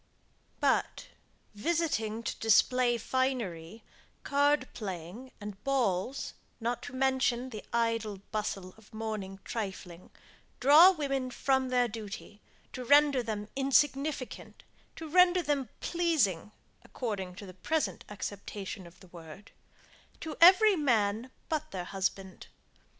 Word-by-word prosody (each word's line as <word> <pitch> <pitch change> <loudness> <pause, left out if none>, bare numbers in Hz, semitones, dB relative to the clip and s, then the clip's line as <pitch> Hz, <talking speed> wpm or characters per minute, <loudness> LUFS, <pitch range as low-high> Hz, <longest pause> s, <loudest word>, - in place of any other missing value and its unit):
But, - - 0 0.4
visiting 230 -4 -1
to - - -3
display 240 +2 +3
finery, 225 -7 -2 0.4
card 285 -1 +2
playing, 195 +4 -7
and 205 -1 -9
balls, 255 -3 -1 0.3
not 235 +1 -2
to - - -15
mention 260 -1 +1
the 215 -3 -7
idle 230 -3 0
bustle 195 -3 -3
of 220 -1 -20
morning 215 -3 -5
trifling, 190 -5 -6 0.5
draw 300 +8 +8
women 275 -7 -1
from 265 0 0
their 250 -1 +2
duty, 210 -1 -8 0.3
to 255 - -5
render 285 0 +5
them 215 -3 -4
insignificant, 275 0 0 0.3
to 325 - -7
render 360 +2 +4
them 280 -5 -1
pleasing, 300 - 0 0.3
according 195 -7 -5
to 200 - -9
the 185 - -10
present 310 - -2
acceptation 200 -2 -6
of 170 +1 -18
the 185 - -15
word, 170 +3 -12 0.7
to 315 -2 -6
every 385 +4 +8
man, 230 - +1 0.2
but 310 -1 -2
their 185 -2 -5
husband. 195 0 -4
235 Hz, 115 wpm, -30 LUFS, 200-275 Hz, 0.7 s, draw